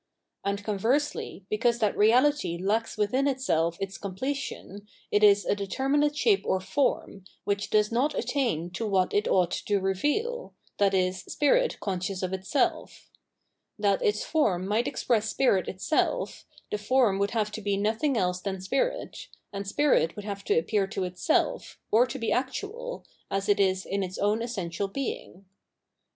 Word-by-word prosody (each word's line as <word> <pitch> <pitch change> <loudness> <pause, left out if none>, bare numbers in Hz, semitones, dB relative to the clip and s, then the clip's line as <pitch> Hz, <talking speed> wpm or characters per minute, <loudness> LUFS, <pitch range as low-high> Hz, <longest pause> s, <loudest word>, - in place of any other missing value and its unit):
And 200 0 -2
conversely, 220 0 -1
because 235 +3 +1
that 215 -4 +1
reality 245 - +3
lacks 215 +6 -1
within 255 +7 +1
itself 170 - 0
its 195 0 -5
completion, 205 -1 -5 0.2
it 205 - +3
is 205 -1 +6
a - - +2
determinate 275 +9 0
shape 405 +4 +3
or 190 - +1
form, 200 -3 -1 0.2
which 200 0 -1
does 210 0 +2
not 260 +6 +1
attain 180 - -1
to 215 +5 -3
what 190 -3 +1
it 205 - +1
ought 180 -2 +2
to 205 -1 0
reveal, 295 - -1 0.2
viz. 190 -2 +2
spirit - - +2
conscious 185 -1 -3
of 185 0 -2
itself. 190 +9 -2 0.7
That 200 -2 +1
its 210 0 +1
form 205 - +1
might 220 +4 +1
express 225 -3 0
spirit 205 -7 +2
itself, 195 - -1 0.2
the 210 - -1
form 215 -3 +2
would 200 0 0
have 215 -1 0
to 215 - -6
be 200 -1 0
nothing 225 +7 0
else 180 -2 0
than 190 -1 -3
spirit, 275 - -2 0.3
and 200 0 -5
spirit 235 - +2
would 210 - -7
have 200 -1 -5
to - - +2
appear 195 +4 +1
to 195 0 -3
itself, 185 - -1
or 235 +4 +5
to 270 - -5
be 230 -3 -2
actual, 415 - -3 0.2
as 195 0 -2
it 205 0 +3
is 190 -1 +2
in 200 +1 -2
its 185 -1 -4
own 210 +2 +1
essential 200 -5 -3
being. 195 -5 -5
205 Hz, 160 wpm, -27 LUFS, 195-260 Hz, 0.7 s, is